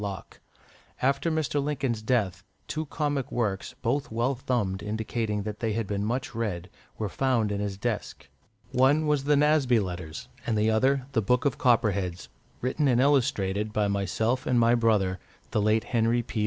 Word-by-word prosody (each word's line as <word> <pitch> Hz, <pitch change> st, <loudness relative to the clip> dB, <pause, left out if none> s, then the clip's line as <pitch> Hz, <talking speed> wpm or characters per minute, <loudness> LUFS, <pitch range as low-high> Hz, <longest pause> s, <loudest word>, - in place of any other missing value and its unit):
Locke. 100 Hz, -3 st, -6 dB, 0.6 s
After 140 Hz, +5 st, +1 dB
Mr. 150 Hz, -3 st, 0 dB
Lincoln's 135 Hz, -6 st, -1 dB
death, 105 Hz, -6 st, 0 dB, 0.2 s
two 155 Hz, 0 st, -3 dB
comic 145 Hz, -3 st, -2 dB
works, 110 Hz, +1 st, -2 dB
both 135 Hz, +4 st, 0 dB
well 120 Hz, +4 st, +1 dB
thumbed, 115 Hz, -7 st, -1 dB
indicating 110 Hz, 0 st, -2 dB
that 105 Hz, +1 st, -5 dB
they 110 Hz, -2 st, -1 dB
had 115 Hz, +1 st, -1 dB
been 100 Hz, 0 st, -2 dB
much 125 Hz, +7 st, -2 dB
read, 100 Hz, -6 st, -3 dB, 0.3 s
were 110 Hz, -, -2 dB
found 115 Hz, -1 st, +1 dB
in 100 Hz, -, -2 dB
his 100 Hz, -1 st, -3 dB
desk. 105 Hz, -, -4 dB, 0.4 s
One 135 Hz, +5 st, +3 dB
was 150 Hz, -2 st, +1 dB
the 145 Hz, 0 st, +4 dB
"Nasby 145 Hz, -5 st, +4 dB
Letters," 90 Hz, -5 st, -5 dB, 0.2 s
and 115 Hz, -2 st, +1 dB
the 110 Hz, +1 st, +3 dB
other 130 Hz, +4 st, +2 dB
"The 115 Hz, -, +1 dB
Book 125 Hz, +5 st, +1 dB
of 140 Hz, -, 0 dB
Copperheads," 100 Hz, -7 st, +1 dB, 0.3 s
written 135 Hz, +4 st, 0 dB
and 125 Hz, -2 st, +3 dB
illustrated 110 Hz, -7 st, +2 dB
by 105 Hz, -1 st, +1 dB
myself 110 Hz, +6 st, 0 dB
and 125 Hz, -1 st, +3 dB
my 115 Hz, 0 st, +4 dB
brother, 105 Hz, -6 st, +2 dB, 0.3 s
the 105 Hz, -, +1 dB
late 110 Hz, +2 st, +2 dB
Henry 120 Hz, 0 st, +1 dB
P. 115 Hz, -, -5 dB
115 Hz, 170 wpm, -27 LUFS, 105-130 Hz, 0.6 s, the